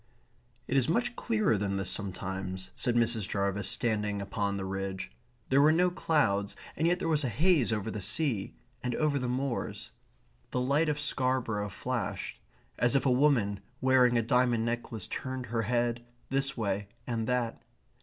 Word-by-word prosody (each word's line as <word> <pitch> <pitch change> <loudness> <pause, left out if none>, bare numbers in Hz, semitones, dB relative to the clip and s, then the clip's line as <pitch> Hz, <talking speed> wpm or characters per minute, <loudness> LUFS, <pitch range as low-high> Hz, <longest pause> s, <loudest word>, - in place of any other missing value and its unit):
"It 130 - -1
is 130 0 +3
much 235 +7 +1
clearer 215 - +1
than 100 -1 -1
this 95 -2 0
sometimes," 95 -1 -3
said 120 -2 0
Mrs. 115 -3 +2
Jarvis, 100 0 0
standing 105 -3 0
upon 100 0 -2
the 95 - -3
ridge. 95 0 -4 0.4
There 135 +1 +5
were 150 +2 +6
no 180 +3 +3
clouds, 105 - +1 0.2
and 160 - +1
yet 175 +1 +3
there 180 - -3
was 155 -2 +2
a 130 - 0
haze 150 - +3
over 110 0 -1
the 105 - -4
sea, 110 - -1 0.3
and 125 -1 -2
over 150 -2 +1
the 125 -1 -2
moors. 130 0 -3 0.6
The 125 - -1
lights 140 +5 +2
of 150 0 -1
Scarborough 130 -7 0
flashed, 120 +3 -4 0.4
as 120 +3 +3
if 140 - +2
a 130 - +4
woman 125 -7 +3 0.2
wearing 130 -2 +4
a 115 - +2
diamond 120 -1 +2
necklace 115 -3 -3
turned 130 -1 -4
her 115 0 -1
head 120 +1 0 0.3
this 135 0 +1
way 100 -2 -1 0.2
and 115 -2 -2
that. 125 -2 -1
120 Hz, 170 wpm, -30 LUFS, 100-135 Hz, 0.6 s, were